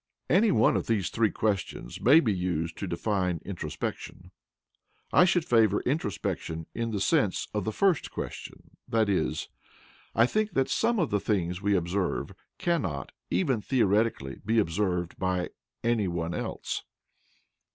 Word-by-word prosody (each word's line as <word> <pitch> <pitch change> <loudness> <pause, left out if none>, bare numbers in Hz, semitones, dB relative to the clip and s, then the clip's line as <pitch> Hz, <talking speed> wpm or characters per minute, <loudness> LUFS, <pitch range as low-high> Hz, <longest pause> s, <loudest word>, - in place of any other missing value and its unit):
Any 210 +6 +5
one 115 -1 +4
of - - -1
these 105 -5 0
three 110 -2 +2
questions 100 - -2
may 140 +7 +7
be 110 -8 +1
used 85 -3 -2
to 100 - -3
define 90 -1 -1
introspection. 90 0 -5 0.8
I 180 - +7
should 175 -3 +2
favour 110 -4 +4
introspection 100 - -2
in 115 0 -2
the 105 -3 -2
sense 105 - +1
of 105 -3 -1
the 110 - 0
first 175 - +2
question, - - -7 0.2
i.e. 100 -9 +2 0.8
I 115 - +6
think 215 - 0
that 135 -1 +1
some 235 0 +2
of 170 -7 0
the 105 - +2
things 90 -3 -1
we 100 0 +2
observe 90 +2 -1 0.2
cannot, 145 - -1 0.2
even 135 - +1
theoretically, 105 - +1
be 110 +3 +1
observed 90 -3 0
by 90 -1 -1 0.3
any 115 -4 +2
one 85 -1 -2
else. - - -3
105 Hz, 140 wpm, -28 LUFS, 90-120 Hz, 0.8 s, may